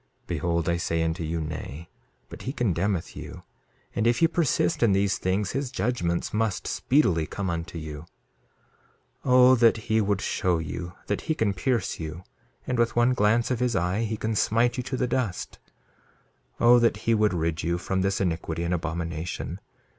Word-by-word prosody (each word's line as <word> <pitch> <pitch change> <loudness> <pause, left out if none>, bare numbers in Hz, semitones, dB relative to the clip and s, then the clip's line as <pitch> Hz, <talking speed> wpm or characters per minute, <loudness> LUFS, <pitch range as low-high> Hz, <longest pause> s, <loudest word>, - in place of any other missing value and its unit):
Behold, 85 -1 -1
I 85 0 +2
say 85 -1 0
unto 80 0 -2
you, 80 +1 -2
Nay. 80 0 -6 0.4
But - - -10
he 130 - -4
condemneth 95 - -1
you, - - -9 0.5
and 110 - +1
if 120 0 +3
ye 165 - +5
persist 160 - +1
in 115 -4 +4
these 100 0 +1
things 95 +2 0
his 135 -1 -2
judgments 95 -7 -1
must 110 -1 0
speedily 90 - +2
come 95 -3 -3
unto 85 0 -4
you. 80 0 -7 1.2
2:15 - - -25
O 125 0 +7
that 115 -1 +5
he 110 0 +1
would 100 -1 +1
show 90 -3 0
you 85 +2 -5
that 105 - -2
he 160 - +2
can 105 -6 +1
pierce 115 0 -1
you, 80 +2 -6 0.4
and 125 -2 -1
with 115 0 +2
one 120 +2 +4
glance 115 +2 +2
of 125 - 0
his 125 -1 +1
eye 90 +3 0
he 110 -1 -2
can 110 +1 -2
smite 115 +3 +2
you 125 - -2
to 130 +1 -4
the 125 - +1
dust! 120 -7 -2 1.0
2:16 - - +1
O 120 +1 +8
that 120 -1 +3
he 115 - +3
would 105 -3 +2
rid 80 0 -1
you 85 +1 0
from 95 +1 -1
this 95 +1 0
iniquity 85 -2 -2
and 85 +1 -1
abomination. 85 -1 -3
100 Hz, 185 wpm, -26 LUFS, 85-115 Hz, 1.2 s, O